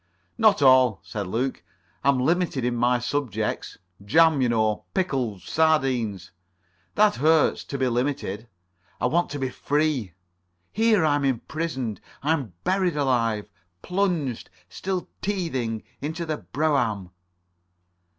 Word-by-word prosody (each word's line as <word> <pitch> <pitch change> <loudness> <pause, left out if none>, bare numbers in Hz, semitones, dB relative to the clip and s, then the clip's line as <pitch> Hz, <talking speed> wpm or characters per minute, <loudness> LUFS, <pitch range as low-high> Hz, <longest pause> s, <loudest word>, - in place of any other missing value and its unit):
"Not 215 -9 +4
all," 130 -5 +5
said 95 +1 -5
Luke, 125 +7 -2 0.4
"I'm 140 -1 +3
limited 160 -2 +1
in 125 0 0
my 120 +1 +2
subjects. 125 -1 -3 0.3
Jam, 160 +6 +4
you 125 - +2
know. 110 -4 +1
Pickles. 130 - -1
Sardines. 125 - +1 0.6
That 210 0 +4
hurts—to 155 -1 +2
be 130 -1 +1
limited. 120 -4 -2 0.5
I - - 0
want 175 +2 +1
to 145 - -4
be 135 -2 -2
free. 145 - -1 0.6
Here, 220 -5 +3
I 150 - +3
am 145 - -2
imprisoned. 135 - -2 0.2
I 155 +3 +3
am 135 - -3
buried 185 -4 +1
alive. 115 -7 0 0.3
Plunged, 180 - -1 0.2
still 185 -1 -4
teething, 135 - -2 0.2
in 150 +3 -3
the 160 -2 -3
brougham." 120 - 0
135 Hz, 120 wpm, -25 LUFS, 115-160 Hz, 0.6 s, all